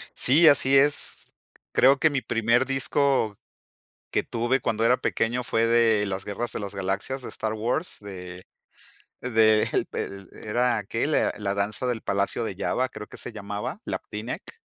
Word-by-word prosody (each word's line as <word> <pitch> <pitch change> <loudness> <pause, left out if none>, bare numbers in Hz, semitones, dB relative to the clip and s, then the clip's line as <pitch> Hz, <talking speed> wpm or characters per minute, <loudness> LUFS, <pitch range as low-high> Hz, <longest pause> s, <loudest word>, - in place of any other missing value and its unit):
Sí, 155 +6 +6
así 140 -2 +5
es. 145 +1 0 0.4
Creo 135 +1 +5
que 160 - +4
mi 135 -3 -1
primer 120 +2 +1
disco 135 -4 +1 0.7
que - - +1
tuve 120 +3 -1
cuando 110 +1 -1
era 125 +2 +4
pequeño 120 0 -1
fue 115 -1 +1
de 115 -3 +3
Las 95 -1 -4
Guerras 115 +4 -4
de - - -4
las 100 0 -6
Galaxias 100 +8 -3
de - - -7
Star 110 -1 -3
Wars, 120 +10 -2
de 90 -3 -9 0.8
del 110 -3 +3
pel 100 -2 -6
era 120 0 0
que 115 +6 -1
le 155 - +2
La - - 0
la 100 -1 -2
Danza 100 +5 -1
del 120 -2 -1
Palacio 100 +4 -1
de 100 - -4
Jabba, 130 +5 -1
creo 105 - -9
que - - -12
se - - -6
llamaba, 105 - -5
Lapti - - -5
Nek. 465 - -7
115 Hz, 170 wpm, -25 LUFS, 105-130 Hz, 0.8 s, Sí